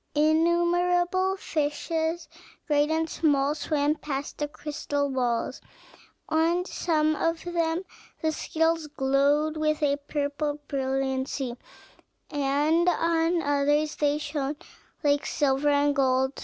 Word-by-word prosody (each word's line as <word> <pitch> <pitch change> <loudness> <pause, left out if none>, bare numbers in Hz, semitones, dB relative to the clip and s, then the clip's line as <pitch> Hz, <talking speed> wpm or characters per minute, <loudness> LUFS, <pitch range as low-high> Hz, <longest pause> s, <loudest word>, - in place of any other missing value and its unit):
Innumerable 350 +4 +2
fishes, 320 +1 -2 0.4
great 295 -1 +2
and 320 0 0
small, 290 -3 +1
swam 295 -1 0
past 285 -2 -5
the 295 - -1
crystal 290 -1 -3
walls; 245 -3 -1 0.7
on 335 +3 +1
some 310 -4 +1
of 330 +1 -1
them 340 0 -1 0.4
the 315 - 0
scales 325 0 0
glowed 285 +2 +1
with 305 0 0
a 285 -1 +2
purple 290 +1 -2
brilliancy, 265 -1 -2 0.8
and 295 +4 +2
on 330 0 +1
others 290 +1 +1
they 290 0 +2
shone 290 -1 -3 0.5
like 285 -1 +2
silver 285 -1 +1
and 285 0 +3
gold. 265 -1 +2
300 Hz, 110 wpm, -26 LUFS, 285-325 Hz, 0.8 s, and